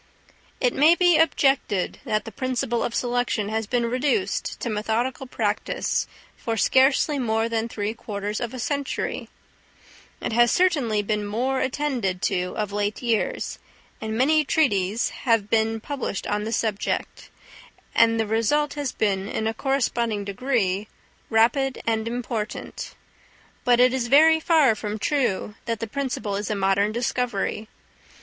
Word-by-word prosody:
It 250 Hz, -, +2 dB
may 310 Hz, +4 st, +5 dB
be 350 Hz, -3 st, +4 dB
objected 275 Hz, -, +1 dB
that 215 Hz, 0 st, -1 dB
the 225 Hz, -, -7 dB
principle 255 Hz, -2 st, -1 dB
of 235 Hz, -, -3 dB
selection 245 Hz, -4 st, 0 dB
has 220 Hz, 0 st, -2 dB
been 240 Hz, +1 st, 0 dB
reduced 270 Hz, -, -1 dB
to -, -, -2 dB
methodical 230 Hz, +5 st, -1 dB
practice 210 Hz, -4 st, -1 dB, 0.3 s
for 225 Hz, -1 st, -3 dB
scarcely 270 Hz, +5 st, +3 dB
more 225 Hz, -2 st, +1 dB
than 230 Hz, 0 st, -2 dB
three 210 Hz, -1 st, -3 dB
quarters 210 Hz, -2 st, -4 dB
of 235 Hz, -2 st, -3 dB
a 255 Hz, -, -7 dB
century; 280 Hz, +3 st, -3 dB, 0.9 s
it -, -, -3 dB
has 240 Hz, +1 st, +5 dB
certainly 275 Hz, -, +2 dB
been 210 Hz, 0 st, -1 dB
more 255 Hz, +6 st, 0 dB
attended 255 Hz, -9 st, -1 dB
to 180 Hz, 0 st, -1 dB
of 210 Hz, -2 st, -2 dB
late 205 Hz, +3 st, -2 dB
years, 230 Hz, -3 st, -1 dB, 0.4 s
and 220 Hz, 0 st, -3 dB
many 305 Hz, +5 st, +4 dB
treatises 225 Hz, -8 st, +1 dB, 0.2 s
have 215 Hz, -3 st, +2 dB
been 225 Hz, 0 st, +2 dB
published 265 Hz, -5 st, -4 dB
on 210 Hz, 0 st, -1 dB
the 225 Hz, -, -3 dB
subject; 220 Hz, -3 st, -2 dB, 0.6 s
and 230 Hz, 0 st, +4 dB
the 225 Hz, -, +1 dB
result 230 Hz, +8 st, +1 dB
has 290 Hz, -4 st, -3 dB
been, 195 Hz, -2 st, 0 dB
in 220 Hz, -, -3 dB
a 220 Hz, -, 0 dB
corresponding 235 Hz, -5 st, -1 dB
degree, 205 Hz, -2 st, -1 dB, 0.4 s
rapid 250 Hz, +4 st, +2 dB
and 225 Hz, -1 st, 0 dB
important. 230 Hz, -2 st, -4 dB, 0.7 s
But 245 Hz, -1 st, +4 dB
it 250 Hz, +1 st, +5 dB
is 255 Hz, -2 st, -1 dB
very 320 Hz, +5 st, +6 dB
far 315 Hz, -7 st, +4 dB
from 210 Hz, 0 st, -4 dB
true 230 Hz, -5 st, 0 dB
that 230 Hz, -2 st, -2 dB
the -, -, -2 dB
principle 250 Hz, -4 st, -3 dB
is 205 Hz, +1 st, -3 dB
a 210 Hz, -, 0 dB
modern 200 Hz, +1 st, +2 dB
discovery. 235 Hz, -2 st, -2 dB
230 Hz, 145 wpm, -24 LUFS, 210-265 Hz, 0.9 s, very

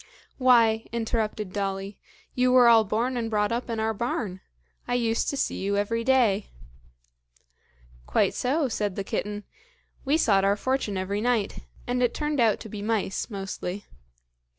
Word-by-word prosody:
"Why," 230 Hz, -4 st, +4 dB
interrupted 220 Hz, -4 st, -2 dB
Dolly, 195 Hz, 0 st, -3 dB, 0.3 s
"you 250 Hz, 0 st, +2 dB
were 250 Hz, -1 st, +7 dB
all 230 Hz, -1 st, +7 dB
born 230 Hz, +5 st, -1 dB
and 230 Hz, -1 st, -2 dB
brought 210 Hz, -1 st, +1 dB
up 240 Hz, +1 st, -2 dB
in 225 Hz, -1 st, -2 dB
our 220 Hz, 0 st, 0 dB
barn! 205 Hz, -4 st, -3 dB, 0.5 s
I 245 Hz, -, 0 dB
used 230 Hz, -2 st, +1 dB
to 280 Hz, -, -3 dB
see -, -, -1 dB
you 200 Hz, +1 st, 0 dB
every 230 Hz, +3 st, 0 dB
day." 230 Hz, -6 st, +2 dB, 1.6 s
"Quite -, -, +2 dB
so," 280 Hz, +4 st, 0 dB
said 210 Hz, -5 st, -2 dB
the 200 Hz, -, -3 dB
kitten; 205 Hz, +1 st, -3 dB, 0.6 s
"we 285 Hz, +3 st, +2 dB
sought 200 Hz, -10 st, +3 dB
our 200 Hz, +1 st, +2 dB
fortune 260 Hz, -4 st, -1 dB
every 200 Hz, +2 st, -2 dB
night, 235 Hz, -4 st, 0 dB, 0.3 s
and 250 Hz, 0 st, -1 dB
it 245 Hz, -2 st, +1 dB
turned 295 Hz, -1 st, -1 dB
out 225 Hz, -3 st, +3 dB
to 220 Hz, -, -8 dB
be 210 Hz, -1 st, -7 dB
mice, 210 Hz, -1 st, -1 dB
mostly. 195 Hz, -1 st, -5 dB
220 Hz, 160 wpm, -26 LUFS, 205-245 Hz, 1.6 s, were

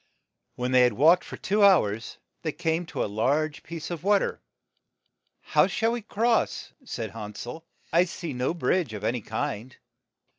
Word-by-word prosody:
When 125 Hz, +1 st, -2 dB
they 130 Hz, -1 st, +6 dB
had 125 Hz, -2 st, +4 dB
walked 160 Hz, -, +5 dB
for -, -, -8 dB
two 205 Hz, +2 st, +1 dB
hours, 115 Hz, -, +3 dB, 0.2 s
they 155 Hz, -, -2 dB
came 165 Hz, +1 st, -1 dB
to -, -, -2 dB
a -, -, 0 dB
large 140 Hz, +9 st, 0 dB
piece 165 Hz, 0 st, -7 dB
of 170 Hz, -1 st, -5 dB
water. 205 Hz, 0 st, +2 dB, 0.4 s
' -, -, -56 dB
' -, -, -51 dB
How -, -, +6 dB
shall 225 Hz, 0 st, 0 dB
we 240 Hz, 0 st, -2 dB
cross? 225 Hz, +3 st, 0 dB
' -, -, -45 dB
' -, -, -28 dB
said 115 Hz, -, -5 dB
Han 105 Hz, -1 st, -8 dB
sel. 160 Hz, +7 st, -8 dB, 0.3 s
"I 170 Hz, +2 st, +5 dB
see 170 Hz, -3 st, -6 dB
no 125 Hz, +6 st, -1 dB
bridge 170 Hz, -8 st, 0 dB
of 105 Hz, -, -7 dB
any 120 Hz, +2 st, 0 dB
kind. 110 Hz, +3 st, -4 dB
155 Hz, 190 wpm, -26 LUFS, 120-180 Hz, 0.4 s, they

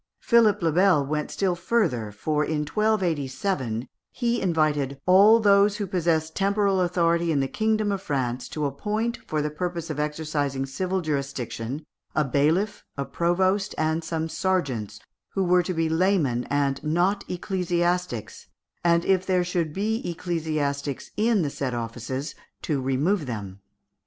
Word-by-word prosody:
Philippe 215 Hz, -5 st, +4 dB
le 165 Hz, -, +3 dB
Bel 175 Hz, -4 st, +4 dB
went 150 Hz, +1 st, -2 dB
still 190 Hz, -2 st, 0 dB
further, 170 Hz, -, 0 dB
for, 150 Hz, +9 st, -1 dB
in 150 Hz, 0 st, -1 dB
1287, 150 Hz, -, -1 dB, 0.2 s
he 240 Hz, -1 st, -1 dB
invited 150 Hz, -6 st, +1 dB
"all 200 Hz, +5 st, +7 dB
those 200 Hz, -1 st, +4 dB
who 205 Hz, -, -2 dB
possess 165 Hz, -4 st, 0 dB
temporal 200 Hz, 0 st, +1 dB
authority 170 Hz, -1 st, +2 dB
in 145 Hz, -, +2 dB
the 135 Hz, -, +1 dB
kingdom 215 Hz, +3 st, 0 dB
of 195 Hz, -1 st, -2 dB
France 125 Hz, -6 st, -2 dB
to 150 Hz, -1 st, -2 dB
appoint, 210 Hz, -, -2 dB
for 155 Hz, -1 st, -1 dB
the 150 Hz, -, -2 dB
purpose 170 Hz, 0 st, -3 dB
of 150 Hz, -, -4 dB
exercising 150 Hz, -3 st, -1 dB
civil 185 Hz, +7 st, -2 dB
jurisdiction, 140 Hz, -2 st, -3 dB, 0.3 s
a 155 Hz, -, +3 dB
bailiff, 160 Hz, -, +1 dB
a 140 Hz, -, -2 dB
provost, 185 Hz, +5 st, +1 dB
and 160 Hz, +1 st, 0 dB
some 160 Hz, 0 st, -2 dB
serjeants, 135 Hz, -, -1 dB, 0.4 s
who 195 Hz, -, +2 dB
were 180 Hz, 0 st, +4 dB
to 180 Hz, 0 st, -3 dB
be 165 Hz, 0 st, +1 dB
laymen, 160 Hz, -8 st, +1 dB
and 140 Hz, -1 st, 0 dB
not 175 Hz, +6 st, +1 dB
ecclesiastics, 175 Hz, -, -2 dB, 0.4 s
and 170 Hz, 0 st, +3 dB
if 190 Hz, -1 st, +3 dB
there 185 Hz, -1 st, +2 dB
should 175 Hz, -3 st, -1 dB
be 215 Hz, +7 st, -1 dB
ecclesiastics 155 Hz, -5 st, -2 dB
in 215 Hz, -3 st, +2 dB
the 145 Hz, -, -1 dB
said 130 Hz, -3 st, -3 dB
offices, 120 Hz, +5 st, -4 dB, 0.3 s
to 145 Hz, -4 st, -1 dB
remove 145 Hz, +6 st, 0 dB
them." 100 Hz, -5 st, -6 dB
165 Hz, 145 wpm, -25 LUFS, 140-190 Hz, 0.4 s, all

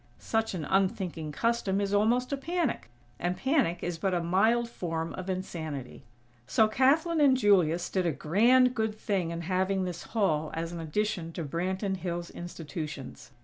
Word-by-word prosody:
Such 225 Hz, -3 st, -1 dB
an 160 Hz, -4 st, -3 dB
unthinking 185 Hz, -5 st, 0 dB
custom 220 Hz, +1 st, 0 dB
is 200 Hz, 0 st, -1 dB
almost 240 Hz, +6 st, +2 dB
a -, -, +3 dB
panic, 325 Hz, -, -2 dB, 0.3 s
and 180 Hz, +1 st, -1 dB
panic 265 Hz, -, +1 dB
is 175 Hz, -2 st, -3 dB
but 190 Hz, +1 st, 0 dB
a -, -, +2 dB
mild 220 Hz, +7 st, +3 dB
form 165 Hz, -7 st, -4 dB
of 185 Hz, +1 st, -6 dB
insanity. 160 Hz, -8 st, -5 dB, 0.4 s
So 220 Hz, -, +4 dB
Kathlyn 300 Hz, +8 st, +3 dB
and 270 Hz, -3 st, +5 dB
Julius 180 Hz, -7 st, +3 dB
did 185 Hz, -2 st, 0 dB
a -, -, +2 dB
grand, 235 Hz, -, +4 dB
good 220 Hz, -2 st, -1 dB
thing 195 Hz, -5 st, -1 dB
in 170 Hz, 0 st, -4 dB
having 190 Hz, +2 st, 0 dB
this 180 Hz, -2 st, -4 dB, 0.2 s
Hall 155 Hz, -7 st, +2 dB
as 165 Hz, +1 st, -3 dB
an 170 Hz, -, -6 dB
addition 170 Hz, +1 st, -2 dB
to 165 Hz, -, -4 dB
Branton 190 Hz, +6 st, -2 dB
Hills' 175 Hz, -1 st, -4 dB
institutions. 155 Hz, -7 st, -7 dB
185 Hz, 165 wpm, -29 LUFS, 165-220 Hz, 0.4 s, and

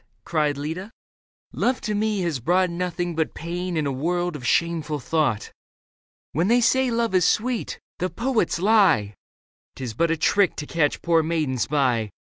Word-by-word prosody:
cried 150 Hz, -3 st, 0 dB
Leda. 160 Hz, +8 st, -5 dB, 0.3 s
" -, -, -48 dB
Love 255 Hz, 0 st, 0 dB
to 215 Hz, -, -2 dB
me 210 Hz, -1 st, 0 dB
has 170 Hz, -7 st, -1 dB
brought 180 Hz, +7 st, +2 dB
Nothing 175 Hz, 0 st, -2 dB
but 160 Hz, -1 st, -1 dB
pain 175 Hz, +1 st, -4 dB
and 155 Hz, -, 0 dB
a 140 Hz, -, 0 dB
world 175 Hz, +5 st, -1 dB
of 125 Hz, -5 st, -5 dB
shameful 160 Hz, -2 st, 0 dB
thought. 130 Hz, -6 st, -1 dB, 0.8 s
When 165 Hz, +5 st, 0 dB
they 240 Hz, +3 st, +4 dB
say 260 Hz, +2 st, +3 dB
love 230 Hz, -3 st, 0 dB
is 185 Hz, -1 st, +4 dB
sweet, 235 Hz, +5 st, 0 dB, 0.2 s
the 185 Hz, -, -1 dB
poets 230 Hz, -1 st, 0 dB
lie; 185 Hz, -, +3 dB, 0.6 s
'Tis 125 Hz, -4 st, -5 dB
but 170 Hz, +9 st, +1 dB
a 165 Hz, -, +1 dB
trick 195 Hz, +4 st, +2 dB
to 150 Hz, -, -5 dB
catch 150 Hz, -2 st, 0 dB
poor 165 Hz, -1 st, +3 dB
maidens 155 Hz, -6 st, -1 dB
by. 125 Hz, -7 st, +1 dB
170 Hz, 170 wpm, -24 LUFS, 150-190 Hz, 0.8 s, they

